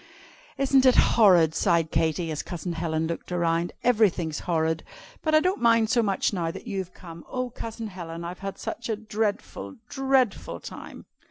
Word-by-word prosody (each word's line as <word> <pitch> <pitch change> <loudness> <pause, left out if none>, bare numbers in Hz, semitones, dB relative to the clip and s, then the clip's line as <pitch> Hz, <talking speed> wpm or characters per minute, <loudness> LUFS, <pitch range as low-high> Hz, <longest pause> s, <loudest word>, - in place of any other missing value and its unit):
"Isn't 270 -1 +4
it 255 - +6
horrid?" 180 -8 +5
sighed 170 -4 +2
Katy, 160 +1 0
as 150 - -2
Cousin 175 0 -5
Helen 160 -1 -1
looked 170 +2 -5
around. 170 0 0
"Everything's 195 -10 +2
horrid. 160 -2 0 0.4
But 310 -1 +2
I - - +8
don't 365 -2 0
mind 230 -2 +4
so 240 - +4
much 200 -1 0
now 170 -4 -1
that - - -8
you've 190 -5 -4
come. 170 -2 -11
Oh, 255 -1 -3
Cousin 225 0 -6
Helen, 170 -4 -7
I've 175 +1 -6
had 195 0 -5
such 235 - -5
a 220 - +1
dreadful, 215 +4 -3
dreadful 265 -5 0
time!" - - -10
190 Hz, 170 wpm, -26 LUFS, 165-230 Hz, 0.4 s, I